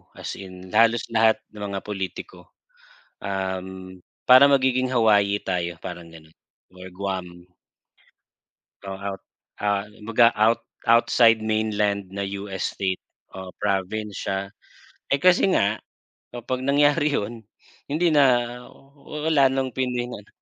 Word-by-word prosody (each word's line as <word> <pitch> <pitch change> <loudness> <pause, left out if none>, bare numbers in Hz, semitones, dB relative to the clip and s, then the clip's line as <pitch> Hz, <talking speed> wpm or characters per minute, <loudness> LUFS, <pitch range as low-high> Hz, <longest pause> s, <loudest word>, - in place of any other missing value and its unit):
as - - -7
in, 95 -1 -11
halos 115 +2 +4
lahat 110 -1 +4 0.2
ng 105 - -11
mga 100 -1 -4
pulitiko. 100 - -7 0.8
Uhm, 95 -1 -5 0.2
parang 130 +3 +8
magiging 130 -1 +1
Hawaii 105 -4 +3
tayo 85 -3 -3
parang 85 -1 -8
ganon 80 -1 -16 0.4
or 90 0 -11
Guam. 90 -2 -6 1.4
Oh 95 -1 -7
at 100 -1 -5 0.4
ah, 100 0 0
kumbaga 115 +2 +2
out 110 +2 +3 0.2
outside 115 -1 +4
mainland 105 -3 -1
na 100 0 -3 0.2
US 95 -2 -4
state 95 -2 -2 0.3
o 95 -1 -9
province 105 +1 -2
siya. 95 - 0 0.7
Eh, 140 - +2
kasi 180 +3 +5
nga 100 - +2 0.6
kapag 120 +2 -3
nangyari 145 +1 +3
yun 115 +3 -3 0.5
hindi 160 +4 +1
na, 145 -2 +5 0.4
oh, 135 - -20 0.2
oh 150 - -6
wala 140 -3 +5
nang 130 0 -1
piningan, 125 -4 -3
105 Hz, 125 wpm, -24 LUFS, 95-120 Hz, 1.4 s, parang